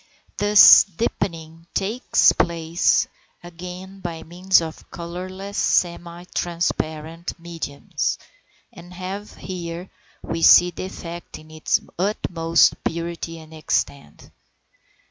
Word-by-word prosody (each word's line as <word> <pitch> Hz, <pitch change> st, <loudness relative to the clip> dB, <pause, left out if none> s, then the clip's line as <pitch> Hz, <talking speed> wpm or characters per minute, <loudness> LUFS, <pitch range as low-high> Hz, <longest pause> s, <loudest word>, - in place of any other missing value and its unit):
This 205 Hz, 0 st, +9 dB
deepening 165 Hz, -4 st, -4 dB
takes 215 Hz, +6 st, +3 dB
place 170 Hz, 0 st, +1 dB, 0.4 s
again 180 Hz, +2 st, -9 dB
by 170 Hz, -3 st, -6 dB
means 180 Hz, +3 st, +2 dB
of 160 Hz, -1 st, -8 dB
colourless 185 Hz, +4 st, -6 dB
semi 175 Hz, 0 st, 0 dB
transparent 165 Hz, -1 st, -3 dB
mediums, 165 Hz, -4 st, -4 dB, 0.6 s
and 175 Hz, +1 st, -13 dB
here 185 Hz, -2 st, -7 dB, 0.3 s
we 165 Hz, -, -4 dB
see 175 Hz, +2 st, +7 dB
the 175 Hz, -, -6 dB
effect 175 Hz, -2 st, -8 dB
in 155 Hz, 0 st, -16 dB
its 155 Hz, 0 st, 0 dB, 0.2 s
utmost 170 Hz, -4 st, +2 dB
purity 165 Hz, 0 st, -4 dB
and 160 Hz, 0 st, -13 dB
extent. 140 Hz, -, -3 dB
170 Hz, 95 wpm, -22 LUFS, 165-185 Hz, 0.6 s, This